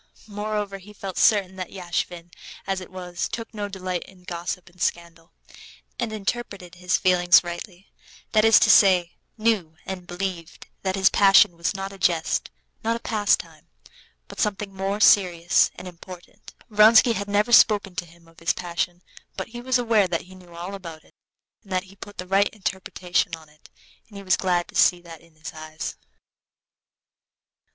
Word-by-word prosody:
Moreover, 210 -1 -4
he 205 +3 -14
felt 195 -2 -7
certain 195 -3 +3
that 185 -1 -5
Yashvin, 175 -2 -4 0.3
as 195 -1 -2
it 185 - -10
was, 180 -1 -5
took 230 0 -6
no 205 -1 -4
delight 185 -2 -4
in 185 -2 -18
gossip 175 0 -5
and 175 0 -17
scandal, 170 0 -3 0.7
and 235 -3 -2
interpreted 200 -4 -4
his 180 +1 0
feeling 180 -1 +1
rightly, 175 +2 -8 0.4
that 215 -1 +3
is 225 0 +7
to - - +6
say, 180 -4 +5 0.3
knew 215 -8 0
and 185 -2 -7
believed 175 -2 -5 0.2
that 190 -1 -1
this 190 -1 +4
passion 195 -3 +6
was 170 +4 -2
not 195 0 -5
a 195 - -13
jest, 170 -3 0 0.3
not 230 +1 0
a - - -5
pastime, 215 -3 -1 0.6
but - - -11
something 205 -2 -2
more 195 +2 -2
serious 180 -5 +4
and 185 - -9
important. 180 0 -13 0.2
Vronsky 220 +3 +6
had 200 -1 -4
never 205 +3 +1
spoken 205 -5 +5
to 175 - -3
him 170 0 -20
of 165 0 -20
his 170 - +1
passion, 175 0 -4 0.3
but - - -5
he 240 +1 -8
was 260 +1 +1
aware 225 -5 +2
that 170 -2 -2
he 185 - -15
knew 180 -2 -15
all 175 +3 -6
about 165 -5 -9
it, - - -25 0.5
and 200 - -19
that 185 0 0
he 195 0 -17
put 205 +1 -12
the 180 - -5
right 195 +2 +2
interpretation 190 -3 -2
on 160 -1 -17
it, 150 0 -21 0.4
and 205 - -13
he 200 - -9
was 185 - +3
glad 180 -2 0
to - - -14
see 180 - +4
that 170 -2 -12
in 165 -1 -23
his 155 -1 -9
eyes. 155 0 -7
185 Hz, 175 wpm, -24 LUFS, 175-205 Hz, 0.7 s, is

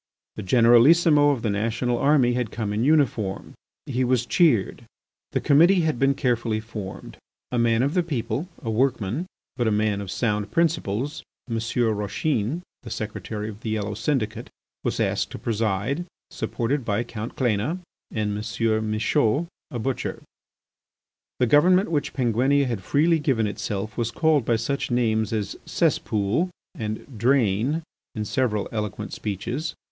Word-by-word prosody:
The - - -5
Generalissimo 135 - +5
of 135 -5 0
the 110 - +1
national 115 +4 0
army 140 -4 +4
had 125 -3 -1
come 110 -2 -3
in 110 +2 0
uniform. 130 -10 +1 0.3
He 130 -1 -1
was 125 -1 +2
cheered. 125 - +2 0.5
The - - 0
committee 170 +6 +5
had 155 -6 0
been 135 0 +3
carefully 120 -4 0
formed. 110 -3 -8 0.3
A 125 - 0
man 115 0 +3
of 140 +3 0
the 180 - +3
people, 135 -1 -3
a 115 - -2
workman, 125 - 0 0.3
but 120 -2 +1
a - - +2
man 105 -1 +1
of 100 - -7
sound 105 -1 -1
principles, 150 -5 0 0.3
M. 115 -2 -2
Rauchin, 115 - -1 0.2
the 120 - -9
secretary 110 -1 -4
of 105 -1 -8
the 110 - -5
yellow 105 -1 -2
syndicate, 110 -1 -2 0.3
was - - -1
asked - - 0
to - - -5
preside, 115 - -1 0.2
supported 130 +3 -2
by 115 +1 0
Count 115 +1 -7
Cléna 125 - 0 0.3
and 105 -1 -2
M. 110 0 -1
Michaud, 110 +6 +2 0.2
a 125 - -5
butcher. 130 +3 -3 1.2
The 125 - +4
government 175 - +4
which 150 -3 -1
Penguinia 130 +3 +2
had 115 -6 -2
freely 160 - +2
given 130 -7 +1
itself 105 0 -4
was 115 -1 0
called 155 0 +2
by 115 - +2
such 140 +5 -2
names 110 -3 +1
as 110 -3 -2
cesspool 110 - +1 0.2
and 110 +2 -6
drain 125 +4 +2 0.3
in 105 -1 -2
several 110 -4 0
eloquent 105 -1 -4
speeches. 120 - -4
115 Hz, 150 wpm, -24 LUFS, 110-140 Hz, 1.2 s, Generalissimo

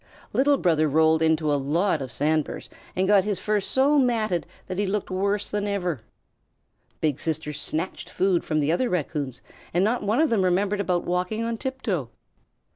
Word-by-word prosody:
Little 280 +1 +3
Brother 155 - +2
rolled 160 +2 +3
into 160 -2 +2
a 140 - +1 0.2
lot 180 -5 +1
of 130 -2 -5
sand 155 +1 +1
burrs - - -9 0.2
and 185 +1 +1
got 200 -1 +5
his 205 -1 -1
fur 210 -1 0
so 275 +8 +3
matted 220 -8 +1 0.2
that 185 - -4
he 205 - +1
looked 200 0 -2
worse 200 +2 -1
than 205 0 -1
ever. 180 - -2 1.0
Big 150 -3 0
Sister 160 -1 -2
snatched 160 +5 -3
food 185 -2 +1
from 155 -2 0
other 175 +11 +1
Raccoons, 145 -6 -3 0.3
and 180 - +4
not 230 +4 +1
one 210 +5 +1
of 315 -3 +3
them 220 -4 +3
remembered 195 +3 +1
about 180 -3 0
walking 180 +5 -1
on 230 0 -1
tiptoe. 225 - -3
185 Hz, 180 wpm, -25 LUFS, 160-210 Hz, 1.0 s, got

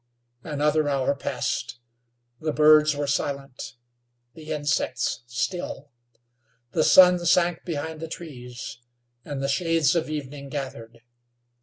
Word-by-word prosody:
Another 150 0 +1
hour 140 -1 +1
passed. 140 -3 -3 0.6
The 155 0 -1
birds 150 0 +5
were 145 0 -2
silent; 140 -2 -3 0.6
the 155 +2 -9
insects 145 -4 -1
still. 140 +3 -4 0.8
The 155 - +2
sun 180 0 +7
sank 175 0 +2
behind 160 -1 -4
the 165 - -5
trees, 125 -8 -8 0.4
and 140 -2 -5
the - - +1
shades 165 +1 +2
of 165 -2 0
evening 140 -2 -6
gathered. 115 -5 -6
145 Hz, 115 wpm, -25 LUFS, 135-160 Hz, 0.8 s, sun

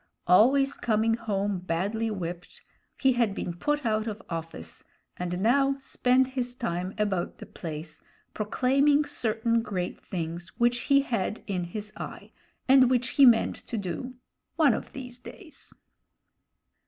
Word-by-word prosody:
Always 265 +10 +5
coming 225 0 +1
home 205 -4 -1
badly 195 +6 -1
whipped, 175 -4 -6 0.3
he 265 -1 +3
had 235 -5 +1
been 175 - -3
put 295 - -1
out 215 0 0
of 215 -1 -4
office, 165 - -6 0.3
and 180 0 -3
now 270 +6 +3
spent 260 -1 +2
his 250 -2 -3
time 185 -6 -3
about 200 -5 -1
the - - -9
place, 155 -1 -7 0.3
proclaiming 275 +7 +2
certain 230 -4 0
great 185 -5 -4
things 170 0 -5
which 240 0 +2
he 275 0 +6
had 230 -5 -2
in 185 -4 -2
his 210 +4 -6
eye - - -8 0.4
and 260 -1 +6
which 250 -2 +1
he 275 -2 +6
meant 230 -2 +4
to 235 - -6
do 205 +7 -4 0.4
one 300 -7 +5
of - - -5
these 250 -2 -8
days. 320 +5 -11
225 Hz, 140 wpm, -27 LUFS, 185-255 Hz, 0.4 s, he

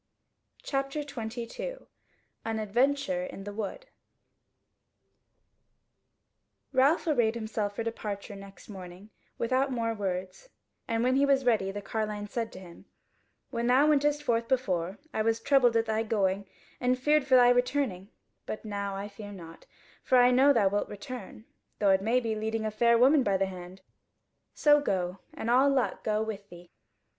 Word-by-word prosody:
CHAPTER 275 +2 -2
22 265 - -6 0.6
An 225 -1 -2
Adventure 270 +6 0
in 235 -8 -7
the 205 0 -7
Wood 220 - -5 2.9
Ralph 275 +7 +3
arrayed 240 -8 +2
himself 215 -2 -3
for 230 - -2
departure 210 -2 -5
next 195 0 -13
morning 190 +1 -10 0.3
without 260 +3 +1
more 230 -2 -1
words; 190 - -4 0.4
and 230 0 0
when 255 +1 +2
he 280 - +4
was 270 -2 +3
ready 215 -5 +2
the 205 +1 -6
carline 210 0 -3
said 230 +1 -3
to - - -9
him: 175 -2 -13 0.7
"When 235 -2 -1
thou 260 +4 +5
wentest 295 0 +2
forth 230 -4 0
before, 195 -8 -1 0.2
I - - 0
was 225 +1 +1
troubled 250 -2 +3
at 225 - +1
thy 220 0 0
going 200 -3 0 0.3
and 250 0 +1
feared 295 +1 +2
for 260 - +5
thy 245 -1 +7
returning: 245 -6 0 0.4
but 215 - -6
now 200 -2 -3
I 200 +1 -5
fear 205 0 -10
not; 165 -4 -12 0.3
for 260 - +3
I 245 0 +6
know 260 +3 +5
that 250 - +3
thou 205 - +1
wilt - - -2
return; 220 +1 -8 0.3
though 200 -2 +3
it 190 0 +3
may 230 +5 +2
be 230 -3 -2
leading 220 +1 -2
a 215 - -1
fair 235 +2 +3
woman 270 +5 +5
by 200 -5 +1
the 195 - +1
hand. 185 0 -9 0.7
So 295 -1 +5
go, 185 -6 -2 0.2
and - - -5
all 255 +4 +5
luck 270 -3 0
go 215 0 0
with 205 -2 -6
thee." 175 0 -14
225 Hz, 165 wpm, -29 LUFS, 200-260 Hz, 2.9 s, thy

